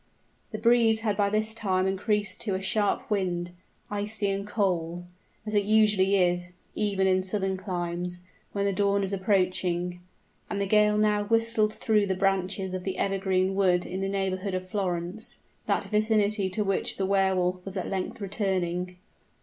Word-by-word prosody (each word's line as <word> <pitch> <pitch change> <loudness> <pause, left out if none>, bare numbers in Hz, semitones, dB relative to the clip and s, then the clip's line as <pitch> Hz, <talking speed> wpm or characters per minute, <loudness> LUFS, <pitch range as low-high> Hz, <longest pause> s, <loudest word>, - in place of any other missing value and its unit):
The 215 - -5
breeze 225 0 +4
had 210 -2 0
by 200 0 +2
this 215 +1 0
time 190 -4 0
increased 200 0 -1
to 200 -4 -1
a - - -1
sharp 200 +2 0
wind, 175 -3 -1 0.4
icy 205 0 -1
and 200 +1 -3
cold, 175 -5 -1 0.4
as 215 - -5
it 205 -1 +3
usually 210 -2 +4
is, 180 -1 +1 0.2
even 200 -2 0
in 185 0 +3
southern 190 0 -1
climes, 180 -2 -3 0.3
when 200 -1 -1
the 200 - +1
dawn 200 +1 +1
is 195 0 -2
approaching; 185 -2 0 0.5
and 200 - -2
the 200 - +1
gale 210 +1 +4
now 210 -1 +2
whistled 225 -1 +1
through 210 -2 +2
the 190 - 0
branches 190 0 0
of 185 -1 -4
the 190 0 -3
evergreen 190 -1 +1
wood 185 -2 +2
in 185 +2 -4
the 195 - -1
neighborhood 195 0 -2
of 185 0 -4
Florence 195 +4 -3 0.3
that 200 - +1
vicinity 210 -1 +1
to 210 +3 0
which 195 -1 -1
the 195 - 0
Wehr 195 -1 +2
Wolf 180 0 -1
was 195 +1 -6
at 185 - -2
length 190 +2 -3
returning! 180 -3 -1
195 Hz, 170 wpm, -27 LUFS, 185-210 Hz, 0.5 s, breeze